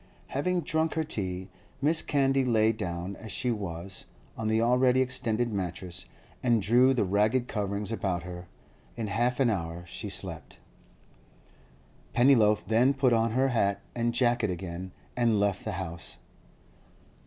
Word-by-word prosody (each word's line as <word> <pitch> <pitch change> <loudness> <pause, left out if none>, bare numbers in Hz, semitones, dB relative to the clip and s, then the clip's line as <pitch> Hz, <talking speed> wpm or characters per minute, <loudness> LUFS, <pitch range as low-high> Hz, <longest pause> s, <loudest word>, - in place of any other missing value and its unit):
Having 180 +6 0
drunk 160 -1 0
her 160 - +1
tea, 95 -10 -4 0.4
Mrs. 160 +2 +3
Candy 135 -2 +2
lay 110 -3 +3
down, 90 -3 -4
as 110 -2 -9
she 125 +6 0
was, 95 -3 -4 0.3
on 110 - -3
the 110 +1 +2
already 125 +2 +3
extended 120 -3 0
mattress, 90 -2 -4 0.4
and 120 -2 +3
drew 125 +6 +4
the 120 - +2
ragged 105 +6 +2
coverings 100 -1 -2
about 95 -6 -1
her. 90 0 -8 0.5
In 115 - -2
half 120 +5 0
an 125 -4 +4
hour 85 -3 -4
she 85 - -6
slept. - - -5 1.6
Pennyloaf 115 -4 +4
then 125 +5 +3
put 130 -3 +3
on 115 0 +2
her 130 +2 +2
hat 100 -5 +1
and 120 0 0
jacket 120 -2 +2
again 90 +1 -5 0.2
and 115 -4 +2
left 100 -1 0
the - - -3
house. 85 -2 -6
110 Hz, 145 wpm, -28 LUFS, 95-125 Hz, 1.6 s, drew